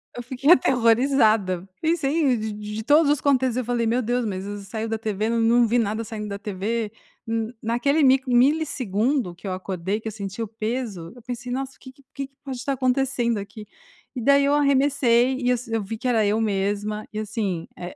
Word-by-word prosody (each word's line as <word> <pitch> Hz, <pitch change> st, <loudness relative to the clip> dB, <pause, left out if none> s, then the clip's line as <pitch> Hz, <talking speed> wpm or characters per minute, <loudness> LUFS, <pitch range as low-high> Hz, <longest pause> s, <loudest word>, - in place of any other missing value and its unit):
Eu 245 Hz, -, -6 dB
fiquei 260 Hz, +5 st, +1 dB
aterrorizada, 225 Hz, -, +3 dB
pensei 310 Hz, -5 st, +1 dB
de 215 Hz, 0 st, -3 dB
de 210 Hz, +1 st, -6 dB
todos 290 Hz, +2 st, +4 dB
os 295 Hz, -, 0 dB
contextos 260 Hz, -3 st, +2 dB
eu 255 Hz, -, -1 dB
falei: 240 Hz, -1 st, 0 dB
"Meu 240 Hz, +3 st, +1 dB
Deus, 245 Hz, +1 st, -1 dB
mas 190 Hz, -2 st, -3 dB, 0.2 s
saiu 220 Hz, +2 st, -4 dB
da 225 Hz, 0 st, -2 dB
TV, 215 Hz, -1 st, -2 dB
eu 230 Hz, 0 st, 0 dB
não 230 Hz, +1 st, +4 dB
vi 240 Hz, +3 st, +2 dB
nada 220 Hz, 0 st, 0 dB
saindo 210 Hz, -1 st, -6 dB
da 200 Hz, 0 st, -5 dB
TV". 210 Hz, +2 st, -3 dB, 0.4 s
N 225 Hz, +1 st, -2 dB
naquele 245 Hz, +7 st, +1 dB
mico 265 Hz, 0 st, +4 dB
milissegundo 250 Hz, -, +1 dB
que 175 Hz, -, -15 dB
eu -, -, -2 dB
acordei, 185 Hz, +2 st, -3 dB
que 220 Hz, -, -8 dB
eu -, -, -3 dB
senti 200 Hz, +1 st, -6 dB
o 225 Hz, -, -2 dB
peso, 220 Hz, -5 st, -4 dB
eu 245 Hz, -, -14 dB
pensei: 245 Hz, +1 st, -6 dB
"Nossa, 270 Hz, +1 st, -3 dB
o -, -, -30 dB
que 260 Hz, -, -12 dB
que 275 Hz, +1 st, -24 dB
que 275 Hz, -1 st, -5 dB
que 275 Hz, -, -41 dB
pode 265 Hz, -3 st, -5 dB
estar 270 Hz, +2 st, -2 dB
acontecendo 255 Hz, -3 st, 0 dB
aqui?". 205 Hz, +1 st, -8 dB, 0.5 s
E 245 Hz, -, -3 dB
daí 280 Hz, +3 st, +4 dB
eu 285 Hz, -, +2 dB
arremessei 270 Hz, -3 st, +3 dB
e 250 Hz, -1 st, +1 dB
s 240 Hz, -1 st, -2 dB
eu 225 Hz, -2 st, 0 dB
vi 225 Hz, +3 st, -5 dB
que 255 Hz, -, -4 dB
era 225 Hz, -4 st, +3 dB
eu 210 Hz, +2 st, +1 dB
mesma 205 Hz, +1 st, -1 dB
e, 215 Hz, -, -3 dB
assim, 205 Hz, -6 st, -3 dB
eh, 175 Hz, 0 st, -8 dB
230 Hz, 210 wpm, -24 LUFS, 215-260 Hz, 0.5 s, todos